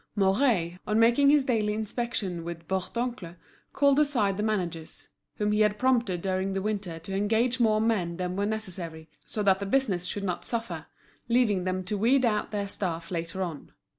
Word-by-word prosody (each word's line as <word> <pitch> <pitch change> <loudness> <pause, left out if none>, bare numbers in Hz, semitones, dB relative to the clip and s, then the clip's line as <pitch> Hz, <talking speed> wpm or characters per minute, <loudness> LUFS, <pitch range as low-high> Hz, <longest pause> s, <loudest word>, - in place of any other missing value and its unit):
Mouret, 195 -4 +2
on 215 - +1
making 240 +5 +5
his 290 -2 +5
daily 215 -4 +1
inspection 215 -5 -3
with 170 -1 -7
Bourdoncle, 190 -1 -3 0.4
called 280 0 +3
aside 245 -10 +2
the 210 - -3
managers, 180 -7 -3 0.3
whom 210 0 0
he 210 - +1
had 210 -1 +3
prompted 235 -8 +1
during 190 0 -1
the 195 - -1
winter 200 -5 -2
to 190 +4 -6
engage 225 +5 +1
more 215 -2 +3
men 195 -7 0
than 180 0 -3
were 200 +1 0
necessary, 175 -7 -4 0.2
so 210 - -2
that 195 -1 +4
the 200 - -3
business 200 -7 +1
should 200 +2 -4
not 180 -3 -2
suffer, 230 -1 -4 0.4
leaving 220 -6 +2
them 185 0 -1
to 200 +2 -3
weed 255 +4 +4
out 210 -2 0
their 205 -1 -2
staff 170 -4 -3
later 170 +2 -3
on. 165 -5 -7
205 Hz, 180 wpm, -28 LUFS, 180-230 Hz, 0.4 s, making